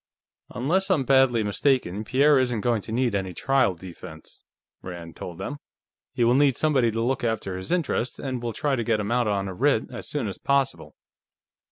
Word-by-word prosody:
"Unless 175 +11 0
I'm 170 -8 +2
badly 130 -3 +4
mistaken, 105 -2 0
Pierre 140 +4 +4
isn't 125 -4 0
going 120 -2 +1
to 110 - -9
need 120 -1 +1
any 95 -3 -2
trial 135 -9 +2
defense," 85 -3 -11 0.4
Rand 85 -2 -8
told 85 -2 -8
them. 145 - -5 0.5
"He 120 - 0
will 120 +1 +4
need 135 -1 +3
somebody 140 -7 +2
to 115 +1 -2
look 130 +1 -1
after 110 -5 -2
his 95 0 -7
interests, 160 -8 -1
and 130 -3 -4
we'll 120 -1 -3
try 140 +5 0
to 120 - -2
get 115 -2 +1
him 105 +1 -3
out 120 -1 +2
on 100 -2 0
a 95 - -5
writ 130 +3 +1
as 120 - -7
soon 140 -7 -2
as 95 - -6
possible." 140 -1 0
120 Hz, 195 wpm, -25 LUFS, 100-135 Hz, 0.5 s, badly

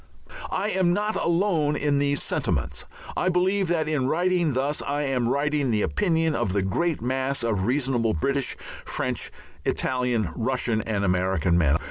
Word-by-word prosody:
I 205 +3 -1
am 180 -2 +2
not 210 +3 0
alone 170 -4 +1
in 145 -1 +1
these 145 0 +1
sentiments. - - -1 0.3
I 185 - +1
believe 185 +2 +2
that 160 -2 0
in 145 -4 0
writing 175 0 +1
thus 140 +4 0
I 145 +1 -1
am 130 -4 0
writing 145 0 +1
the 110 -3 +1
opinion 165 -5 +1
of 120 -9 -1
the 100 -1 +1
great 155 - 0
mass 130 +1 -1
of 105 -5 0
reasonable 125 -4 +1
British, 140 - -1 0.3
French, - - -2 0.3
Italian, 125 -7 0
Russian, 120 -2 0
and 105 -2 -1
American 90 -1 +1
men. 80 -4 +4
140 Hz, 155 wpm, -25 LUFS, 115-165 Hz, 0.3 s, men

